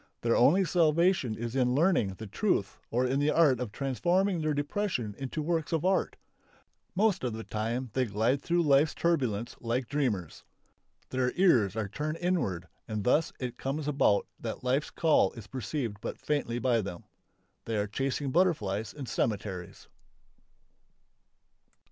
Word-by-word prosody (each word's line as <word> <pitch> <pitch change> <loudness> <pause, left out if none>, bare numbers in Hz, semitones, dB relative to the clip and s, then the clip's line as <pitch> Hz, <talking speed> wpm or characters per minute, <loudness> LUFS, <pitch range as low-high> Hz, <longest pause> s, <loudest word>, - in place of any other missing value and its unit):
Their 115 0 +2
only 180 +10 +5
salvation 170 - +2
is 120 +2 -4
in 125 -1 +2
learning 145 - +2
the 110 - -8
truth 100 - -1
or 125 +2 +1
in 130 +2 +1
the 145 +1 +2
art 150 -5 +4
of 125 -4 -4
transforming 175 - 0
their 155 -1 0
depression 145 - -2
into 135 +3 -3
works 160 -1 -1
of 165 0 0
art. 190 0 +1 0.8
Most 205 -3 +2
of 125 -3 -1
the 110 +1 -5
time 115 +4 -3
they 130 -1 +1
glide 115 +5 0
through 175 0 +1
life's 145 0 +4
turbulence 125 -10 0
like 120 +1 -1
dreamers. 115 - -2 0.7
Their 130 -1 +1
ears 120 - +4
are 110 -2 -2
turned 150 +9 -3
inward 130 - -1 0.2
and 105 -2 -3
thus 150 +8 +2
it 125 -2 -5
comes 145 +2 -3
about 135 -8 +3
that - - -5
life's 130 +4 +1
call 155 - +3
is 115 - -10
perceived 125 -2 -4
but - - -5
faintly 140 -6 -1
by 120 -2 +2
them. 95 -4 -7 0.6
They 115 -1 -2
are 105 - +1
chasing 135 +5 -2
butterflies 110 - +1
in 145 -2 -6
cemeteries.... 100 -7 -3
130 Hz, 155 wpm, -29 LUFS, 110-155 Hz, 0.8 s, only